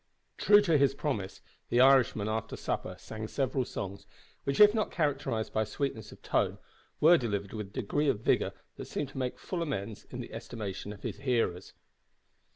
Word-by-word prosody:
True 205 0 +7
to 165 -7 +3
his 135 -1 +3
promise, 110 -11 -3 0.3
the 120 - +2
Irishman 130 -5 +5
after 110 0 -2
supper - - -3
sang 110 0 -7
several 130 +1 -1
songs, 100 -2 -6 0.4
which, 140 0 -1
if 210 0 +9
not 220 -2 0
characterised 140 -8 -1
by 110 - +2
sweetness 110 -1 -4
of - - -15
tone, - - +1 0.4
were 170 +3 +7
delivered 100 -5 -3
with 105 -2 -4
a - - -17
degree 130 +7 -1
of 115 -6 0
vigour - - +2 0.3
that - - -6
seemed 145 - -3
to 135 - -7
make 125 -1 -2
full 180 -2 -4
amends 110 -9 -4
in - - -8
the - - -7
estimation 105 -3 -6
of 105 - -11
his - - -4
hearers. 120 -9 -1
125 Hz, 180 wpm, -30 LUFS, 105-140 Hz, 0.4 s, if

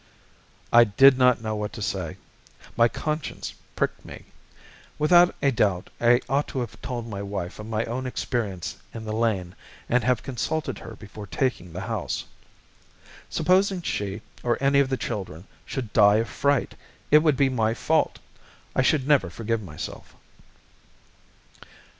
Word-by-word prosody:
I 120 0 +9
did 130 +5 +6
not 125 -2 +4
know 110 0 -2
what 105 0 -4
to 110 - -7
say. 90 -6 -3 0.6
My 115 - +5
conscience 155 +5 -4 0.2
pricked - - -1
me. - - -11 0.7
Without 175 +3 +5
a 140 - +4
doubt 100 -7 0
I 120 +1 +5
ought 140 +3 +1
to 130 - -4
have 110 -2 -7
told 120 -2 -4
my 100 -3 -5
wife 100 -2 -5
of 105 - -7
my 110 0 -1
own 130 +3 -3
experience 105 -8 -3 0.2
in 110 -1 -6
the 110 - -3
lane, 105 -6 0 0.3
and 125 +1 +2
have 125 -1 +1
consulted 145 +4 -3
her 115 - -9
before 105 0 -10
taking 95 -5 -2
the 90 +3 -6
house. 105 -2 -3 1.0
Supposing 185 0 +2
she, 100 -6 -3 0.2
or 120 -1 +1
any 140 +1 +3
of 140 -2 +3
the 130 - 0
children, 95 -6 -5 0.2
should 120 -6 -5
die 105 -1 +6
of 115 +2 +1
fright, 140 -2 0 0.4
it 150 - +9
would 155 -3 +2
be 140 - +4
my 115 -3 +1
fault. 160 +4 +1 0.6
I - - +4
should 135 +1 +2
never 140 - +4
forgive 115 +5 -2
myself. 80 -7 -8
115 Hz, 155 wpm, -25 LUFS, 105-135 Hz, 1.0 s, I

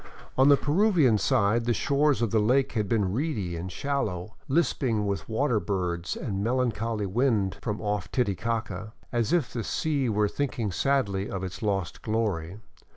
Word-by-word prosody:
On 135 +2 +5
the 140 - +7
Peruvian 150 - +3
side 115 -2 +2
the 120 -1 +1
shores 140 -2 +2
of 115 - 0
the 110 - +3
lake 125 +6 +2
had 105 -4 -1
been 100 -5 +1
reedy 110 - -2
and 90 +2 -5
shallow, 110 -9 -2
lisping 130 -8 +1
with 100 +1 -3
water 115 0 +1
birds 90 -4 -2
and - - -5
a 100 - -1
melancholy 115 -3 0
wind 105 -2 +1
from 105 -2 -3
off 105 -3 -2
Titicaca, 110 -2 -2 0.2
as 120 0 0
if 170 -6 +1
the 115 - -2
sea 140 +1 0
were 105 -1 +2
thinking 120 -4 -2
sadly 105 -5 0
of 95 -1 -4
its 95 +5 -6
lost 100 -5 -2
glory. 100 -6 -1
110 Hz, 165 wpm, -27 LUFS, 100-130 Hz, 0.2 s, the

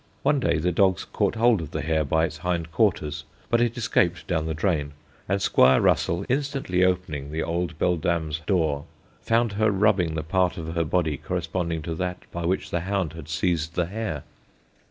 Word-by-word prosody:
One 145 - +3
day 85 -9 +1
the 90 +3 +1
dogs 95 +1 +2
caught - - -1
hold 115 -3 +3
of 80 - -6
the - - -3
hare 80 0 +1
by 80 +3 +2
its - - -6
hind 85 -2 -2
quarters, 75 -1 +1 0.3
but 120 0 +4
it 120 0 0
escaped 90 -6 +1
down 80 -3 -1
the 80 - -2
drain, 75 -4 0 0.4
and 100 +1 +2
Squire 65 -8 +5
Russell, 85 +3 +2
instantly 135 -9 0
opening 85 -6 -1
the 80 +1 -2
old 85 +1 -2
beldame's 80 -2 0
door, 80 -7 +1 0.4
found 115 0 +2
her 110 +2 +2
rubbing 95 -5 +2
the 80 - -2
part 90 +3 +1
of 80 -1 -5
her 85 -1 +1
body 80 -2 0
corresponding 85 0 -3
to 85 - -3
that 90 +2 -3
by 85 0 -4
which 95 - -1
the 85 - 0
hound 95 -2 -2
had 80 -2 -10
seized 80 +1 -1
the 90 - +1
hare. 95 -6 -4
85 Hz, 190 wpm, -25 LUFS, 80-95 Hz, 0.4 s, Squire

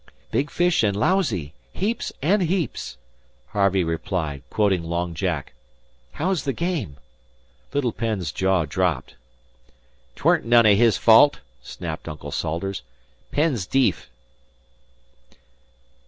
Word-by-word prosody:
"Big 140 +2 0
fish 175 -1 +2
and 100 -3 +1
lousy 110 - 0 0.2
heaps 215 +5 -2
and 195 +7 +3
heaps," 175 -4 -2 0.5
Harvey 100 -2 +2
replied, 80 -3 -3
quoting 100 -4 +2
Long 85 +1 -2
Jack. 85 -5 -3 0.6
"How's 180 -1 -1
the 135 - -1
game?" 165 - -3 0.7
Little 140 -4 0
Penn's 105 -9 -2
jaw 95 -2 +1
dropped. 85 -2 -1 1.0
"'Tweren't - - +2
none 120 0 +5
o' 105 - +7
his 110 -1 +4
fault," 120 +6 +6 0.2
snapped 80 -3 -7
Uncle 75 -2 -7
Salters. 85 +3 -3 0.5
"Penn's 145 - 0
deef." 135 -1 +1
100 Hz, 110 wpm, -23 LUFS, 85-145 Hz, 1.0 s, o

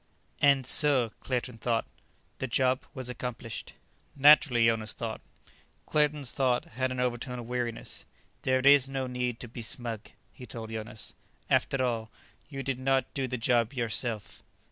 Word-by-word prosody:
"And 140 -2 +5
so," 130 -4 +3
Claerten 125 -2 -3
thought, 115 0 0 0.5
"the 130 - -2
job 130 +1 +1
was 130 -2 -4
accomplished." 125 -2 -5 0.4
"Naturally," 140 -4 +6
Jonas 115 -2 +1
thought. 115 -2 -5 0.6
Claerten's 150 -3 +1
thought 130 -3 +1
had 130 +3 -2
an 130 - -3
overtone 125 +1 -1
of 120 - -6
weariness. 120 -1 -3 0.4
"There 130 0 +2
is 140 0 +6
no 135 -1 -2
need 125 -2 -2
to 120 - -6
be 120 +1 -8
smug," 115 -3 -2 0.2
he 125 - -11
told 110 0 -7
Jonas. 110 0 -5 0.4
"After 135 -1 +2
all, 115 -3 -1 0.4
you 135 -2 -5
did 135 -1 -2
not 135 0 +1
do 135 -2 -1
the 125 0 -3
job 120 +1 +2
yourself." 115 -3 -2
125 Hz, 150 wpm, -29 LUFS, 115-130 Hz, 0.6 s, Naturally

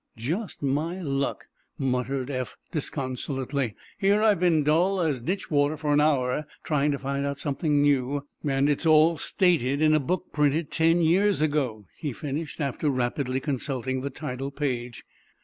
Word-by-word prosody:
"Just 165 - -4
my 155 +7 -1
luck," 140 -5 -2 0.3
muttered 130 0 -1
Eph, 130 -2 -4
disconsolately. 135 - -3 0.2
"Here 200 +2 +3
I've 210 -5 +4
been 170 -4 +3
dull 175 +6 +2
as 150 -8 0
ditch 185 +10 -3
water 145 +1 +2
for 150 -1 0
an 145 - +4
hour, 145 -1 +1 0.2
trying 150 -1 +1
to - - -1
find 140 +1 -2
out 140 0 -2
something 145 +1 0
new, 140 0 +1 0.2
and 140 -1 +2
it's 150 +3 +1
all 155 +1 +6
stated 145 -5 +1
in 155 0 +4
a 155 - +4
book 180 +6 -3
printed—ten 160 +3 +2
years 190 +5 +3
ago," 140 -9 0
he 145 -5 -3
finished, 150 +5 -5
after 145 +1 -1
rapidly 130 0 -1
consulting 130 -2 -2
the 140 - -3
title 130 0 -5
page. 125 -5 -3
145 Hz, 155 wpm, -26 LUFS, 135-155 Hz, 0.3 s, all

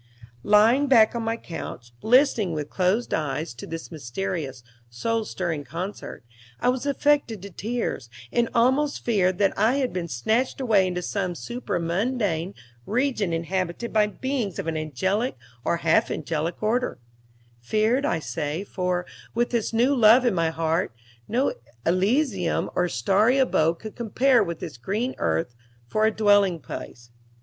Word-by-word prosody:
Lying 225 - +4
back 230 -5 +6
on 235 - -2
my 225 0 -1
couch, 125 - -8
listening 240 - +3
with 150 -1 -4
closed 190 +6 +1
eyes 150 -2 -2
to 120 - -9
this 165 +1 -7
mysterious, 145 -2 -4 0.3
soul 220 - -1
stirring 170 -7 -3
concert, 170 - -6 0.3
I - - +2
was 255 +2 -1
affected 285 -5 +2
to 200 - -8
tears, 215 - -3 0.2
and 235 -1 +1
almost 265 +5 +2
feared 185 -6 +2
that 200 -1 +2
I 220 +6 +3
had 270 -3 0
been 175 -2 -3
snatched 220 - 0
away 215 -7 +3
into 180 -1 -3
some 185 -2 -2
supra 240 -3 -4
mundane 185 0 -1 0.3
region 240 -5 0
inhabited 180 +6 -2
by 215 -1 +4
beings 235 - -3
of - - -3
an 165 -1 -2
angelic 190 - -1 0.3
or 170 - +1
half 160 - +4
angelic 160 +4 -3
order 240 +4 0 0.6
feared, 220 - +1
I 230 - +1
say, 160 +2 -3
for, 180 -2 -2 0.3
with 240 +1 +1
this 235 -3 0
new 240 +5 +3
love 235 +1 +6
in 240 - +3
my 165 -2 +1
heart, 165 -3 -1 0.3
no 255 +5 +1 0.3
elysium 195 - +1
or 180 0 +1
starry 215 +8 +3
abode 165 -11 +3
could 215 +3 -9
compare 245 +2 +3
with 170 -3 -5
this 150 - -6
green 215 - -2
earth 80 +7 0 0.3
for 215 - +2
a - - +2
dwellingplace. 195 - +1
200 Hz, 150 wpm, -25 LUFS, 165-235 Hz, 0.6 s, back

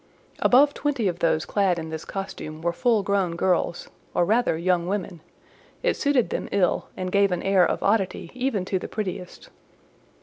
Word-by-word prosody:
Above 285 +3 +5
twenty 275 -7 -1
of 175 -2 -2
those 160 -1 +1
clad 195 -4 +1
in 160 -1 -5
this 160 0 -6
costume 165 -5 -6
were 170 0 0
full 230 0 +2
grown 195 -4 0
girls, 175 -1 0 0.3
or 175 - +3
rather 220 -4 +2
young 175 0 +1
women; 190 -4 -3 0.6
it - - +2
suited 280 -5 +1
them - - -3
ill, 195 -3 +1
and 185 0 -3
gave 200 0 +3
an 180 - -2
air 195 -2 +4
of - - 0
oddity 195 -4 0
even 250 -7 -1
to 190 0 -1
the - - -6
prettiest. 190 -4 -6
190 Hz, 175 wpm, -24 LUFS, 175-215 Hz, 0.6 s, Above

